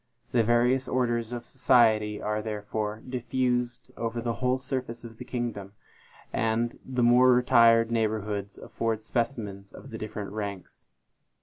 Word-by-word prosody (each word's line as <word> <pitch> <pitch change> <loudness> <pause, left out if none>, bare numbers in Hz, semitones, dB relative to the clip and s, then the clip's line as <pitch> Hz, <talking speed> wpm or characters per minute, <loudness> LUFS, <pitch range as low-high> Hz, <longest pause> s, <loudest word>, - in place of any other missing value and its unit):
The 120 -2 +3
various 120 +3 +2
orders 120 -2 0
of 120 -1 -5
society 110 -5 +3
are 105 0 -2
therefore 105 0 -4
diffused 125 0 -1
over 115 0 -3
the 115 0 -1
whole 125 0 +2
surface 130 -3 -5
of 115 -1 -11
the - - -5
kingdom, 115 -6 -4 0.6
and 115 +1 0
the 125 -2 -1
more 125 +2 +6
retired 115 -2 +5
neighborhoods 105 -3 -1
afford 110 -1 -3
specimens 110 -5 -3
of - - -12
the 110 - -6
different 105 -2 -5
ranks. 100 -3 -7
115 Hz, 135 wpm, -27 LUFS, 110-125 Hz, 0.6 s, more